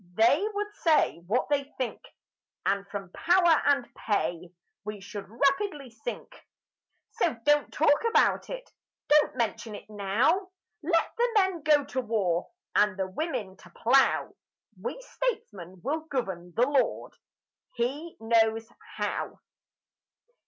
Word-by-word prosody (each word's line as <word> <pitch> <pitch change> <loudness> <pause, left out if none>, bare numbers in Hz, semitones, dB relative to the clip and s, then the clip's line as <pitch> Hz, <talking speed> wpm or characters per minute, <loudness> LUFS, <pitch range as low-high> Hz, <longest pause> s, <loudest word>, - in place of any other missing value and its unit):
They 235 - +4
would 415 0 -3
say 310 - +3
what 235 +6 +1
they 285 -1 +2
think; 255 -3 -3 0.6
And 200 0 0
from 195 -2 -6
power 345 - +4
and 275 -4 +3
pay 175 -4 -2 0.3
We 210 0 -6
should 200 0 -8
rapidly 275 - 0
sink. 225 +2 -8 0.7
So 330 - 0
don't 295 0 +3
talk 290 -1 +3
about - - +3
it, - - -6 0.4
Don't 300 0 +4
mention 225 -1 -2
it - - -11
now; 215 - +1 0.3
Let 335 +1 +1
the 480 +1 +3
men 380 -5 +2
go 290 -1 +4
to 260 - -2
war 200 -7 0 0.3
And 210 -2 +3
the 190 -1 -2
women 200 - -3
to 180 - -16
plough; 255 +9 +3 0.5
We 480 - -4
Statesmen 195 - -4
will 300 +4 0
govern.... 195 - -4
The 235 - +4
Lord, 280 -2 0 0.6
He 280 +8 -3
knows 225 0 +2 0.3
how! - - -3
245 Hz, 130 wpm, -28 LUFS, 205-310 Hz, 0.7 s, They